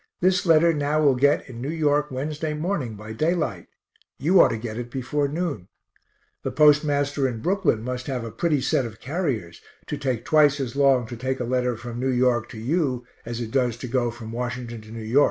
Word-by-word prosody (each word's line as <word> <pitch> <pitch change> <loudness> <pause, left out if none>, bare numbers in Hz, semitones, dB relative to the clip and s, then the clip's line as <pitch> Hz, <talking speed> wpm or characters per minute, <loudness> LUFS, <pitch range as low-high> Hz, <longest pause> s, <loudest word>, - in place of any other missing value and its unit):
This 185 0 +2
letter 165 +1 +5
now 150 0 0
will 145 -3 +5
get 140 +3 +2
in 120 -3 -9
New 135 - -3
York 150 -2 +1
Wednesday 150 +4 -3
morning, 150 - -2
by 105 +1 -8
daylight 150 - -1 0.5
you 170 +6 +5
ought - - +7
to 115 - -2
get 110 -1 -5
it 120 0 -5
before 140 +3 -1
noon. 150 - -3 0.7
The - - -2
postmaster 145 -2 +3
in 120 -3 -4
Brooklyn 175 - +1
must 125 +1 -4
have 130 -4 -2
a 115 - -6
pretty 155 +1 0
set 130 - +1
of 110 -3 -7
carriers, 130 - -3 0.2
to - - -4
take 125 -4 -2
twice 150 -2 +4
as 130 -2 -3
long 135 -3 +4
to 120 +2 -7
take 130 +3 -3
a - - -1
letter 125 -1 0
from 120 0 -7
New 130 +1 0
York 125 -2 +2
to 110 - -9
you 130 0 -1 0.2
as 120 0 -4
it 115 -2 -5
does 125 -3 +1
to 125 - -6
go 120 0 +1
from 115 -1 -8
Washington 120 -1 -4
to 110 - -15
N. 110 0 -7
Y. 140 - +7
130 Hz, 210 wpm, -24 LUFS, 120-150 Hz, 0.7 s, ought